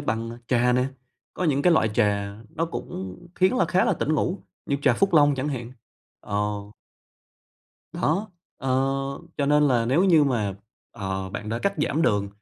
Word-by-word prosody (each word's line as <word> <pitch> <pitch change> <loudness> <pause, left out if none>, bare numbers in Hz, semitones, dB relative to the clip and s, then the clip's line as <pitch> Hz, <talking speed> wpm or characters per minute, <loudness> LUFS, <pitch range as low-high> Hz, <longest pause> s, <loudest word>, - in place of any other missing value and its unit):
bằng 115 +2 -3
trà 125 0 +3
nè, 125 +1 +2 0.5
có 185 - -2
những 145 -3 +2
cái 175 - +5
loại 110 - +3
trà 100 -1 +1
nó 165 - -1
cũng 95 - -6 0.2
khiến 185 +6 +3
là - - +3
khá 185 - +2
là - - +2
tỉnh 155 - 0
ngủ 175 +5 0 0.3
như 140 - 0
trà - - +5
Phúc 195 -2 +1
Long 145 -2 +6
chẳng 135 +3 -2
hạn, 125 -3 -5 0.5
ờ. 105 0 -1 1.4
Đó, 190 +8 0 0.3
ờ, 135 - -4 0.7
cho 140 - 0
nên 150 +1 +4
là 120 -3 +2
nếu 150 +9 +3
như 165 -6 +5
mà, 110 -7 0 0.4
ờ, 95 -3 -4
bạn 105 +2 -6
đã 115 +1 -1
cắt 200 +7 0
giảm 150 +1 0
đường 100 -9 +2
130 Hz, 180 wpm, -25 LUFS, 105-160 Hz, 1.4 s, Long